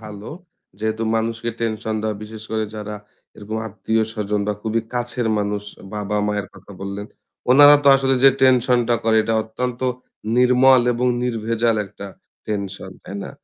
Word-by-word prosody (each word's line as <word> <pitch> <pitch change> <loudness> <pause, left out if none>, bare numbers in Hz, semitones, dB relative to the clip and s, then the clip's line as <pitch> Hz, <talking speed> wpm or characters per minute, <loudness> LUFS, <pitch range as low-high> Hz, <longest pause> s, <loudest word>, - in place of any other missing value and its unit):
ভালো। 105 -1 -9 0.5
যেহেতু 110 +1 -2
মানুষকে 115 +1 -2
টেনশন 110 -1 -2
দেওয়া 110 -1 -2
বিশেষ 110 0 -9
করে 110 -1 0
যারা 105 0 -6 0.4
এরকম 110 +1 -6
আত্মীয়-স্বজন 110 -1 -1
বা - - +2
খুবই 110 +1 0
কাছের 120 -1 -1
মানুষ 105 0 -2 0.3
বাবা-মায়ের 105 0 -1
কথা 95 +1 -14
বললেন। 100 +1 -5 0.4
উনারা 145 +3 +9
তো - - +6
আসলে 135 0 +1
যে 135 - +9
টেনশন 125 -1 +4
টা 120 - +4
করে 110 -1 +3
এটা 115 +1 -1
অত্যন্ত 120 +2 -4 0.6
নির্মল 125 +1 +6
এবং 125 +2 -1 0.2
নির্ভেজাল 115 -1 0
একটা 100 +1 -10 0.4
টেনশন, 100 -2 -4
তাই 95 - -9
না? - - -7
110 Hz, 145 wpm, -21 LUFS, 105-120 Hz, 0.6 s, উনারা